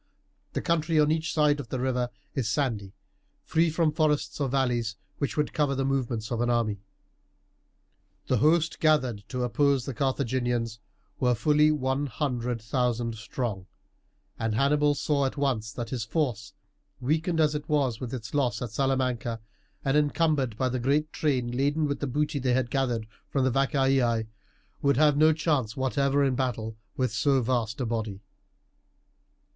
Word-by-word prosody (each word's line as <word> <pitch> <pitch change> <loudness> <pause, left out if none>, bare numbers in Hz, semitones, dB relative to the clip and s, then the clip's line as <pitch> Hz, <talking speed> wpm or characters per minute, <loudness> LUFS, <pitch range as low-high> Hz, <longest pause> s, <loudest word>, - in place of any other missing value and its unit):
The - - -2
country 165 -2 +1
on 150 0 +4
each 160 +1 0
side 150 -2 +3
of 125 -5 -7
the 130 - -3
river 125 -1 0 0.2
is 125 -6 -1
sandy, 115 -8 -1 0.5
free 165 +1 +2
from 160 0 +1
forests 150 -1 0
or 140 - +1
valleys, 120 -4 0 0.2
which 140 - -2
would 150 - 0
cover 145 -2 +1
the 135 0 0
movements 125 -5 -1
of 120 -1 -1
an 120 - +1
army. 115 -4 +1 1.5
The 130 - +1
host 160 +6 +2
gathered 130 -9 +2
to 125 -1 -2
oppose 140 +1 +2
the 135 - -4
Carthaginians 120 -3 -1 0.4
were 125 -1 +3
fully 150 +6 +4
one 140 -1 0
hundred 125 -3 -2
thousand 120 -1 0
strong, 105 -3 -4 0.7
and 115 -1 -1
Hannibal 145 +3 +3
saw 140 -1 +1
at 135 - -6
once 125 -6 0
that 115 -1 -6
his 125 -4 -2
force, 110 -6 -2 0.5
weakened 160 +5 0
as 155 -1 +3
it 150 +1 -5
was 135 -7 +1
with 125 -2 -5
its 115 -4 -6
loss 125 -5 +1
at 120 - -5
Salamanca, 125 -2 0 0.5
and 135 +1 +2
encumbered 145 -5 +1
by 130 - +1
the 130 0 -1
great 145 +5 +1
train 130 -7 0
laden 145 +4 +1
with 140 -1 -2
the 145 - -2
booty 145 +2 -1
they 130 -1 +1
had 125 -2 0
gathered 125 -5 0 0.2
from 135 - +1
the 130 - +2
Vacaei, 135 -4 +2 0.6
would 140 -2 +3
have 150 -1 +5
no 155 +2 +6
chance 150 -8 0
whatever 140 +1 +1
in 135 -2 +2
a - - -2
battle 115 -4 -2 0.2
with 130 -4 0
so 135 +4 +3
vast 120 -2 -1
a 130 - -1
body. 110 -3 -3
130 Hz, 165 wpm, -27 LUFS, 120-145 Hz, 1.5 s, no